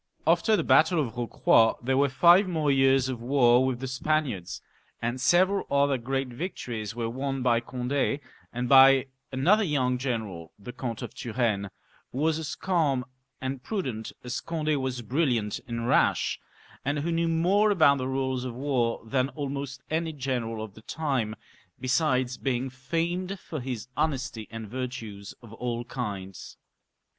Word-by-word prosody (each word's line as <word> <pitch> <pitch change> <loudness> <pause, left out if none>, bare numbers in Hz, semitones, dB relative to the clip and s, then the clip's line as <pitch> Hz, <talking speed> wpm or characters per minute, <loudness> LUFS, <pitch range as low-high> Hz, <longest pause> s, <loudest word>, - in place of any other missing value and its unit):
After 220 - +4
the - - 0
battle 160 +2 +4
of 125 -7 -1
Eocroy 115 -1 +3
there 130 +2 0
were 140 +1 +3
five 175 +8 +6
more 155 -5 +1
years 135 -1 +4
of 125 -3 -4
war 125 -1 +4
with 130 -2 -1
the 130 - -4
Spaniards, 130 - -1 0.4
and 120 +2 -2
several 185 +6 +3
other 140 -1 +2
great 135 +2 -2
vic 165 +10 -5
tories 110 -3 -5
were 115 -1 -2
won 135 +2 -3
by 120 -2 +3
Cond^, 130 +3 -1 0.3
and 125 +1 -3
by 135 +1 +7 0.3
another 180 +12 +3
young 130 -7 +1
general, 110 - -4
the 115 +4 -9
Count 120 -3 -5
of - - -7
Turenne, 110 -4 -1 0.4
who - - -7
was 160 +2 +1
as 155 -2 -4
calm 150 -9 +1 0.3
and 130 0 -4
prudent 130 - -4
as 125 +2 -3
Cond^ 155 -2 -1
was 125 -2 -3
briUiant 120 -4 0
and 115 -1 -3
rash, - - +2 0.4
and 145 +2 -1
who 155 +4 -1
knew 165 0 +1
more 180 +6 +3
about 155 -8 +5
the 130 - -2
rules 130 -1 -1
of 125 -2 -5
war 125 -4 0
than 130 +3 0
almost 140 -2 -5
any 160 0 -1
general 125 -5 -3
of 110 -3 -9
the 110 - -14
time; 130 -6 -2 0.4
besides 130 -1 +1
being 130 -1 -1
femed 170 +8 -2
for 155 - -6
his 125 -2 -5
honesty, 130 -7 -2
and 115 -1 -7
virtues 110 -4 -6
of 115 -2 -12
all 120 0 -3
kinds. 100 -7 -6
130 Hz, 160 wpm, -27 LUFS, 120-145 Hz, 0.4 s, by